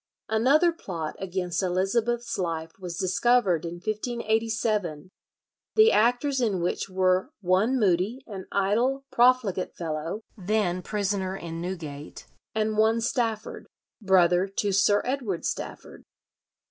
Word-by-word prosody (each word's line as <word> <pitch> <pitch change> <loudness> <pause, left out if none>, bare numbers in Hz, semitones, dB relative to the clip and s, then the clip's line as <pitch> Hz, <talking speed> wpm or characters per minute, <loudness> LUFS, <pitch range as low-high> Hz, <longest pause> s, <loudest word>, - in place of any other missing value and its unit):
Another 275 +10 +4
plot 170 - -6
against 180 -1 -2
Elizabeth's 215 +6 0
life 165 -2 -2
was 175 -2 -6
discovered 190 -2 +2
in 170 +1 -5
1587, 215 -4 -1 0.6
the 440 +1 +7
actors 245 +4 +2
in 210 -6 +1
which 175 +3 -2
were 185 +3 +1
"one 200 +8 +2
Moody, 205 +5 +1
an 195 -3 -8
idle, 235 +8 +1
profligate 240 -7 +2
fellow, 165 +4 -4
then 195 -3 0
prisoner 195 -1 -2
in 165 -2 -6
Newgate, 155 -5 -7 0.3
and 215 0 0
one 220 +1 +4
Stafford, 230 -2 -2 0.3
brother 185 -2 +4
to 200 +1 -1
Sir 200 +1 +3
Edward 245 -9 -2
Stafford." - - -5
200 Hz, 115 wpm, -26 LUFS, 180-230 Hz, 0.6 s, the